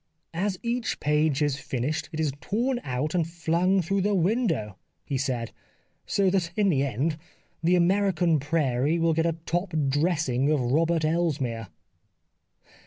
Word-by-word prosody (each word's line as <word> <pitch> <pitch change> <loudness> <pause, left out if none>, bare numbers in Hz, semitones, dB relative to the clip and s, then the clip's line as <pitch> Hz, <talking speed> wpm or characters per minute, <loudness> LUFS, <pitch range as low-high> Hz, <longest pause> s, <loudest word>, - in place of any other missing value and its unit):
'' - - -50
As 190 -3 -2
each 235 0 -2
page 150 0 +2
is 140 -2 0
finished 145 +5 -3
it 160 - -5
is 155 -3 +1
torn 240 +8 -1
out 130 +4 -2
and 170 -3 +1
flung 175 +3 +1
through 195 +4 0
the 205 +1 +1
window," 170 - 0 0.3
he 140 - -3
said, 125 -4 -2 0.3
" - - -43
So 195 -2 +2
that 180 -3 +1
in 205 -2 +3
the 140 -6 +2
end 140 +4 -1 0.4
the 170 +2 +3
American 175 -3 +2
prairie 145 0 +1
will 165 -1 +2
get 165 +1 +1
a 165 -1 -1
top 175 +1 -2 0.2
dressing 145 -3 +1
of 150 - +2
Robert 155 +6 +1
Elsmere." 145 - -1
160 Hz, 160 wpm, -26 LUFS, 140-180 Hz, 0.4 s, in